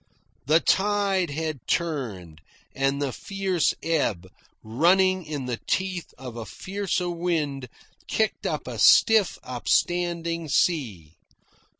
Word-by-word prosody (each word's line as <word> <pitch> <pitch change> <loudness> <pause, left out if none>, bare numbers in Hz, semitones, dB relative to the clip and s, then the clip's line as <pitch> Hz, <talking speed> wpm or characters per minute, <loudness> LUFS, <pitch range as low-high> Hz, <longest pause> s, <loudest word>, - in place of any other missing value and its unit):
The 155 +2 +5
tide 195 -1 +1
had 155 0 -3
turned, 110 - -3 0.3
and 135 +1 0
the 140 -2 -1
fierce 195 -4 -1
ebb, 115 - 0 0.4
running 185 +11 +3
in 150 -4 -5
the 125 -2 -3
teeth 185 -2 -2
of 125 -2 -8
a 115 - -5
fiercer 190 - -3
wind, 155 -7 -2 0.4
kicked 220 -1 -1
up - - -3
a - - -6
stiff, 220 -4 +5
upstanding 170 +5 -1
sea. 110 - 0
165 Hz, 110 wpm, -25 LUFS, 130-185 Hz, 0.4 s, The